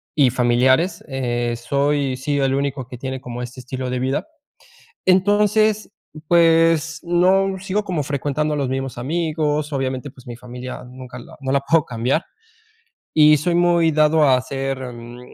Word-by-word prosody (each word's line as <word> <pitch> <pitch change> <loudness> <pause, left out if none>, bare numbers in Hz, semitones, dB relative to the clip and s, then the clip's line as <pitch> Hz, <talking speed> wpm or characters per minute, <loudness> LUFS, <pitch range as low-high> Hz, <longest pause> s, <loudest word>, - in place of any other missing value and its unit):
y 140 -4 +4
familiares, 130 +7 +2
eh, 120 -3 -2
soy 140 +1 0
sí 145 +1 -1
el 135 -1 +1
único 140 -2 -2
que 125 - -9
tiene 130 +1 -5
como 125 -1 -7
este 125 +1 -9
estilo 130 0 -5
de 125 - -2
vida. 130 - -2 0.8
Entonces, 205 +3 +3 0.4
pues, 165 -1 +3
no 190 +3 +2
sigo 195 +2 -1
como 175 -6 -2
frecuentando 145 +2 -2
a - - -2
los 140 -2 -1
mismos 135 -1 -4
amigos. 150 +1 -1
Obviamente, 135 0 -3
pues, 125 -1 -18
mi 120 - -7
familia 125 +1 -8
nunca 125 0 -10
la 120 - -13
no 130 -1 -2
la 140 - +3
puedo 155 +2 +2
cambiar 125 +7 -1 0.9
y 150 -1 +6
soy 170 +4 -1
muy 170 -2 +3
dado 155 +1 +3
a 135 -3 +5
hacer, 135 +1 -3 0.2
mm, 120 +1 -11
140 Hz, 160 wpm, -20 LUFS, 130-165 Hz, 0.9 s, y